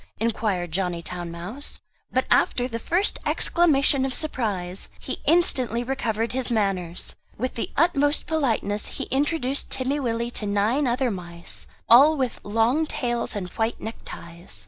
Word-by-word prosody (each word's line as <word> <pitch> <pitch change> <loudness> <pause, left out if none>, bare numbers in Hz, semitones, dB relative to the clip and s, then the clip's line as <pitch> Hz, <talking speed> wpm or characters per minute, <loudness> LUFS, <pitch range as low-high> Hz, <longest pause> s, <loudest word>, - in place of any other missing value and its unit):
inquired 210 -6 -1
Johnny 175 -1 -1
Town 175 0 -5
mouse. 180 - -5 0.3
But 255 - +1
after 245 0 +3
the 230 -2 -4
first 355 - +2
exclamation 280 -5 +3
of 265 -1 -1
surprise 200 - -2
he - - -5
instantly 255 -8 +3
recovered 235 -3 -1
his 260 0 -2
manners. 195 -6 -1 0.2
With 255 +4 -2
the 230 - -3
utmost 290 -2 +3
politeness 230 -9 0
he - - -2
introduced 280 0 0
Timmy 265 +2 0
Willie 235 -2 -1
to 210 - -2
nine 215 +8 +1
other 245 0 +1
mice, 175 -2 -5 0.2
all 285 +7 +7
with 260 -3 -1
long 230 +9 +2
tails 240 -5 -2
and 185 -3 -4
white 225 +3 -2
neckties. 170 - -8
235 Hz, 145 wpm, -24 LUFS, 200-270 Hz, 0.3 s, all